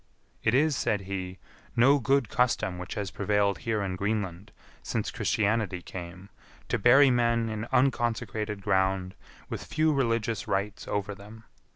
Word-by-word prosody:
"It 110 +2 +2
is," 150 +1 +3
said 105 -4 0
he, 95 -1 -5 0.4
"no 135 +5 +5
good 135 0 +2
custom 105 -7 0
which 90 - -6
has 100 -3 -3
prevailed 100 -1 +1
here 110 -3 -1
in 95 -2 -2
Greenland 100 -1 -3 0.3
since - - -2
Christianity 105 -4 0
came, 90 +2 -9 0.4
to - - 0
bury 130 +5 +6
men 115 -2 +2
in 110 0 -4
unconsecrated 115 -5 0
ground 95 -1 +1 0.3
with - - -5
few 155 0 +1
religious 115 -4 0
rites 100 +1 -2
over 100 0 -2
them. 105 +3 -13
105 Hz, 145 wpm, -28 LUFS, 95-120 Hz, 0.4 s, bury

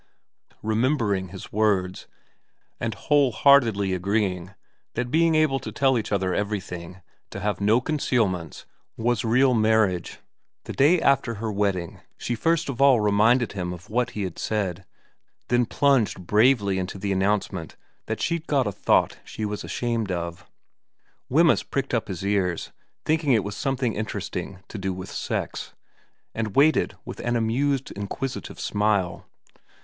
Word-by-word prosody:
Remembering 110 -4 +1
his 95 +1 -10
words, 100 -4 0 0.7
and 115 -2 -2
whole 145 +3 +2
heartedly 115 -7 +4
agreeing 95 -1 -1 0.4
that 125 - 0
to 125 - -8
be 160 +2 +3
able 150 -4 +2
to - - -7
tell 135 -2 +2
each 115 - -2
other 95 -2 0
everything, 95 -3 -4 0.3
to - - -7
have 105 -1 -2
no 105 +4 +4
concealments, 115 - -1 0.3
was 120 -1 0
real 125 +3 +3
marriage, 110 -6 +2 0.5
the - - -6
day 155 +6 +4
after 135 -6 +2
her 110 +1 -3
wedding 100 -4 -1 0.2
she 120 - -3
first 165 +7 +1
of 135 -2 -4
all 135 -4 +6
reminded 110 +3 +3
him 90 -3 -4
of 90 +2 -10
what 125 +2 +1
he 105 - -1
had 90 -3 -5
said, 95 -4 -2 0.6
then 120 0 +2
plunged 125 -11 +1
bravely 105 -2 +3
into 90 +1 -4
the 100 +1 -3
announcement 95 -3 -1 0.3
that - - -3
she'd 170 -1 -2
got 140 -4 +2
a 105 - -1
thought - - +1
she 110 - -5
was 105 0 -4
ashamed 115 -4 -2
of. 85 -1 -5 0.8
Wemyss 165 +4 +4
pricked 135 -1 -3
up 115 - 0
his 95 -1 -5
ears, 95 -4 0 0.3
thinking 155 -3 +2
it 110 -4 +3
was 100 0 -5
some 135 +3 -1
thing 125 -4 0
interesting 100 -3 -5
to 110 - -7
do 95 0 -2
with 95 +1 -7
sex, - - -4 0.6
and 110 -3 -3
waited 155 +3 +3
with - - -8
an 120 0 -1
amused, 130 +4 0
inquisitive 105 +6 -5
smile. 105 -4 0
110 Hz, 155 wpm, -25 LUFS, 95-125 Hz, 0.8 s, all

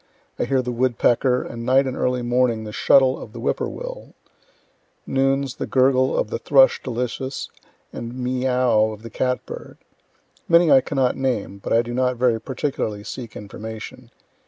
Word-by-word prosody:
I - - +1
hear 130 +1 +1
the 125 - -3
woodpecker, 125 +1 +2
and 115 0 -7
night 130 +3 +3
and 130 -1 -3
early 125 -1 0
morning 120 -2 +1
the 105 - -7
shuttle 130 +4 +4
of 110 - -10
the 120 - -8
whip 120 - 0
poor - - -2
will - - -8 0.9
noons, 135 0 0
the - - -4
gurgle 130 0 +3
of - - 0
thrush 135 0 +4
delicious, 125 +2 -4 0.4
and 120 +1 -6
meo 130 +1 -1
o 125 -4 +3
ow - - -5
of 105 +1 -12
the 115 - -9
cat 125 +3 -1
bird. - - -9 0.7
Many 170 -1 +5
I 135 - +7
cannot 130 -1 0
name; 120 -7 -2
but - - -6
I 115 +1 +4
do 120 +1 -6
not 125 0 0
very 120 -2 +2
particularly 115 -5 -3
seek 120 +1 -8
information. 110 +1 -8
125 Hz, 175 wpm, -22 LUFS, 115-130 Hz, 0.9 s, I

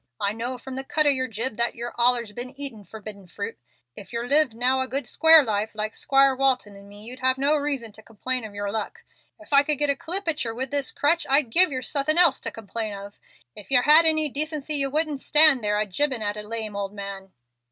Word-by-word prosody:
I 200 +1 -1
know 240 +3 -5
from 260 +1 -9
the 265 - -3
cut 305 +3 0
of 290 - +5
yer 260 -1 -1
jib 225 +1 -4
that 235 0 0
yer've 240 +1 -7
allers 240 -2 +2
been 250 +4 -7
eatin' 255 -7 -4
forbidden 210 -3 -11
fruit. 205 +5 -7 0.4
If 200 - -12
yer 235 0 -4
lived 280 -2 +2
now 255 +3 0
a 260 - -1
good 275 +2 -3
square 320 -1 +5
life 215 -2 -3
like 215 0 -4
'Squire 275 -1 +2
Walton 255 -6 -1
and 200 0 -15
me, 205 +1 -11
you'd 250 +3 -8
have 260 0 +1
no 280 +3 +1
reason 280 -6 -3
to 215 - -14
complain 250 +3 -4
of 210 -2 -10
yer 205 0 -4
luck. 225 - -5 0.4
If 320 -2 -12
I 280 - +6
could 295 0 0
get 295 0 +2
a - - -2
clip 360 +7 -4
at 310 -2 -1
yer 225 -1 -5
with 260 +2 -4
this 285 -2 0
crutch 325 +4 0
I'd 275 -3 +2
give 365 +5 +5
yer 255 -1 -4
suthin' 300 +4 +2
else 345 -6 +4
to - - -6
complain 220 0 -6
of. 200 +1 -11 0.4
If 210 - -13
yer 250 -2 +5
had 310 +3 +6
any 310 -1 +3
decency 300 +1 0
yer 275 -1 +3
wouldn't 300 0 0
stand 300 -4 +4
there 210 0 0
a 215 - 0
jibin' 245 +4 -1
at 205 0 -2
a 210 - -6
lame 215 -1 -6
old 200 0 -5
man." 195 -1 -8
255 Hz, 245 wpm, -23 LUFS, 215-285 Hz, 0.4 s, I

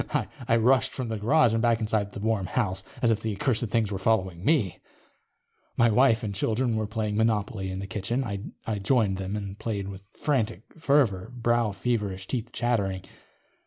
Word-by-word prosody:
_ - - 0 0.2
I 115 - +4
rushed 125 +3 +3
from 125 -3 -4
the 110 - -2
garage 120 +2 +4
and 115 - +1
back 115 -1 +3
inside 105 -2 0
the - - -6
warm 105 -3 0
house, 95 -6 -1 0.2
as 115 - +5
if 110 -1 0
the 110 -2 -2
accursed 120 +1 0
things 110 -1 0
were 95 - -2
following 95 -4 0
me. 115 - +2 1.0
My 115 -1 +5
wife 120 0 +4
and 105 -2 -2
children 115 +4 0
were 110 -1 -1
playing 105 -1 -2
Monopoly 110 -2 0
in 95 0 -4
the 100 - -4
kitchen. 115 +5 -2 0.4
I 110 -2 -2
joined 100 -2 +2
them 95 +1 -3
and 100 -1 -5
played 100 -4 -3
with 95 0 -8 0.2
frantic 115 - 0 0.2
fervor, 135 -11 +2
brow 120 -2 +1
feverish, 100 -2 -2
teeth 120 +1 -3
chattering. 100 -6 -1
110 Hz, 185 wpm, -27 LUFS, 100-120 Hz, 1.0 s, as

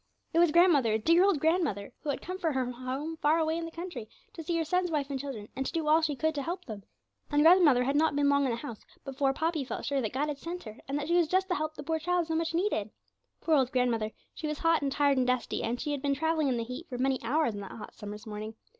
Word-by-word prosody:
It 330 - +3
was 345 -2 +5
grandmother, 300 -10 +4
dear 335 - +4
old 390 -6 +3
grandmother, 315 - 0
who 300 - -6
had 280 - -2
come 370 +1 -5
from 325 -6 -1
her 255 -1 0
home 260 +6 -4
far 305 +1 +3
away 320 0 +1
in 335 0 -3
the - - -6
country 330 -11 -7 0.2
to 330 - -7
see 335 +2 -1
her 330 - +1
son's 360 +3 +1
wife 290 -3 -1
and 270 - -2
children, 255 -7 -6
and 265 - -1
to - - -3
do 325 -2 -2
all 315 +2 +5
she 305 -2 0
could 315 +3 0
to 290 - -3
help 350 +5 -4
them. 215 -3 -7 0.5
And 295 0 +3
grandmother 320 -7 +6
had 275 +3 0
not 305 0 +3
been 290 0 +2
long 280 0 +3
in - - +1
the 235 - 0
house 235 -3 -7 0.3
before 270 0 0
Poppy 320 +1 -1
felt 260 - -5
sure 280 -1 0
that 220 - -2
God 280 +4 -1
had 290 -2 -4
sent 350 +3 -6
her, 215 -2 -10
and 275 +1 -1
that 290 0 -3
she 340 - 0
was 340 -2 +3
just 375 +3 +1
the - - +2
help 310 -2 -2
the - - -7
poor 320 +2 -1
child 350 +1 0
so 325 - -3
much 330 0 -1
needed. 335 - 0 0.5
Poor 325 - +1
old 265 -4 +3
grandmother! 240 -4 +1 0.2
she 315 - -5
was 300 0 -3
hot 330 0 +2
and 280 -1 -1
tired 285 -1 +2
and 250 - +1
dusty, 250 -1 0
and 240 +2 -2
she 300 - -3
had 285 -2 -2
been 280 0 +1
travelling 320 0 +1
in 255 -2 +1
the 230 - -1
heat 250 +9 -7
for 250 - -5
many 265 +1 +1
hours 250 +1 +1
on 205 - -6
that 195 - -8
hot 220 - -9
summer's 210 +1 -8
morning. 215 0 -6
290 Hz, 285 wpm, -29 LUFS, 255-325 Hz, 0.5 s, grandmother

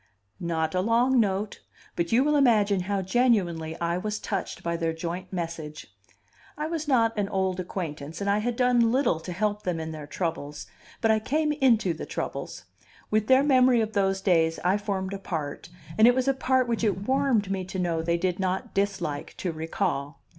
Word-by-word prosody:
Not 160 -2 -1
a 185 - +1
long 240 +5 +3
note! 205 -1 -1 0.3
But 170 -1 -1
you 240 +3 +4
will 300 +1 +2
imagine 215 -8 +4
how 200 -1 0
genuinely 185 -8 +1
I 170 +1 0
was 210 +2 -3
touched 195 -3 -4
by 170 0 -1
their 165 -1 -1
joint 175 +3 -5
message. 165 -4 -6 0.6
I 300 - -2
was 315 -1 -3
not 230 -5 +3
an 200 -1 0
old 190 -2 -1
acquaintance, 160 -4 -5
and 200 - -3
I 200 +1 +3
had 240 +2 -1
done 245 -2 +3
little 245 - +2
to 170 +3 -7
help 210 +3 -1
them 180 -4 -2
in 160 0 -4
their 155 -2 -8
troubles, 150 -3 -4 0.4
but 225 - +4
I 220 - +3
came 300 +7 0
into 245 - +3
the 160 - -7
troubles; - - -5 0.5
with 215 0 +1
their 260 +1 +6
memory 255 -3 +5
of 220 -1 -1
those 195 -1 +1
days 165 -4 +2
I 180 +2 +3
formed 200 -2 -3
a 195 - -4
part, 160 -5 -5 0.3
and 220 - +8
it 245 - +5
was 260 0 0
a 275 - +4
part 260 -1 +1
which 235 -1 -1
it 200 -2 0
warmed 255 -7 +2
me 190 -1 -1
to 190 - -6
know 170 -3 0
they 170 +1 0
did 180 +1 -1
not 190 0 -2
dislike 195 -7 -2
to 180 - -2
recall. 160 -4 -3
195 Hz, 195 wpm, -26 LUFS, 170-230 Hz, 0.6 s, and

